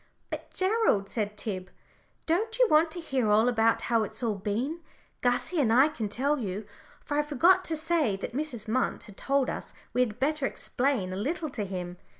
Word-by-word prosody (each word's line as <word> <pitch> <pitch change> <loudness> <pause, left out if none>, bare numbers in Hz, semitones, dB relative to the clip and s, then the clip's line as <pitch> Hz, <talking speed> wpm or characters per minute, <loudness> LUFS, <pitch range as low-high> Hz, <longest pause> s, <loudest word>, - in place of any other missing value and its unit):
"But, - - -5
Gerald," 375 - +2
said 210 -2 -3
Tib, 185 -3 -4 0.6
"don't 435 +8 0
you - - +5
want 310 +2 +5
to 345 - -6
hear 265 -9 0
all 215 +3 +5
about 225 -2 +3
how 230 -2 +2
it's 215 +3 -3
all 225 -2 +1
been. 215 - -2 0.4
Gussie 250 +8 +1
and 245 -6 +3
I 265 +6 +6
can 225 -8 -4
tell 280 +7 0
you," 205 -2 -4 0.4
for 290 0 -1
I - - +5
forgot 335 +6 +4
to 325 - -1
say 315 - +1
that 195 - -6
Mrs. 260 -6 -4
Munt 250 +3 0
had 205 - -12
told 275 +2 +1
us - - -5 0.2
we 250 - +2
had 235 -2 -1
better 285 0 +1
explain 245 -9 -1
a - - -4
little 310 - -2
to 210 -5 -3
him. 180 -2 -5
250 Hz, 195 wpm, -28 LUFS, 210-310 Hz, 0.6 s, I